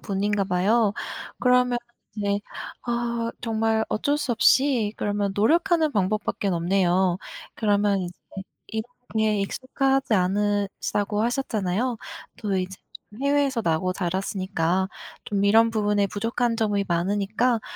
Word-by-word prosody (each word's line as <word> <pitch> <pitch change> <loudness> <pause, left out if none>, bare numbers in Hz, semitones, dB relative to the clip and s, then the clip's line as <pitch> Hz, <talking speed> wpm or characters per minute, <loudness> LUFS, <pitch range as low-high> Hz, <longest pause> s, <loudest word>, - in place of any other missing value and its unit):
분인가 200 0 0
봐요. 200 +4 +2 0.5
그러면 250 -1 +3 0.4
이제 205 -1 0 0.4
아 235 -1 -1
정말 225 -1 +1
어쩔 285 +7 0
수 275 -4 -1
없이 240 -2 +3
그러면 205 -1 -1
노력하는 320 - +3
방법밖에는 200 -2 0
없네요. 180 +1 +2 0.4
그러면 205 -2 +2
이제 180 -1 -4 0.6
이런 220 0 -3 0.3
게 215 -1 +2
익숙하지 270 +4 0
않으시다고 205 +1 0
하셨잖아요. 235 -2 -1 0.4
또 205 -3 -2
이제 185 0 -3 0.5
해외에서 280 -3 +2
나고 170 +2 +1
자랐으니까 185 0 -1 0.3
좀 200 -1 0
이런 225 +3 +5
부분에 210 -2 +1
부족한 230 +3 -1
점이 205 -3 +1
많으니까, 205 +7 +1
210 Hz, 285 characters per minute, -25 LUFS, 195-235 Hz, 0.6 s, 이런